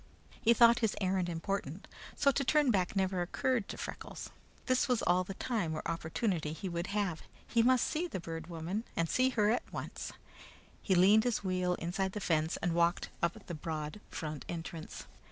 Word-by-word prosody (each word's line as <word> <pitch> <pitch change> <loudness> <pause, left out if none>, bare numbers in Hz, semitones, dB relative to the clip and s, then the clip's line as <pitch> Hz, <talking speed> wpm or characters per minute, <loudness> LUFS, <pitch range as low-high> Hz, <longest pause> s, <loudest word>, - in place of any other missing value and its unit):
He 235 -1 +5
thought 235 0 +7
his 225 -3 +1
errand 185 -2 +1
important, 175 0 -3 0.3
so 280 - +4
to 275 - 0
turn 295 -1 +4
back 185 -2 +1
never 190 -1 +1
occurred 225 +5 0
to - - -5
Freckles. - - -7 0.3
This 255 +1 +2
was 250 -3 +1
all 180 +1 +3
the 195 +1 -7
time 200 -11 -1
or - - -4
opportunity 165 0 -1
he 190 - -5
would 170 0 -3
have. 200 -6 -1 0.3
He 235 - +3
must 255 +1 +4
see 330 +3 -1
the 245 - -4
Bird 165 -1 -6
Woman, 175 +5 -3
and 165 - +1
see 255 +9 +3
her 215 -4 +2
at 245 - -1
once. - - -5 0.7
He 190 - +2
leaned 200 +5 +6
his 240 -4 0
wheel 180 -1 +1
inside 190 +3 -2
the 210 - -3
fence 160 -4 +1
and 175 -2 +1
walked 170 +1 +2
up 170 0 -1
the 175 - -6
broad 155 +3 -4
front 155 -3 -5
entrance. 165 -1 -6
185 Hz, 190 wpm, -33 LUFS, 170-225 Hz, 0.7 s, thought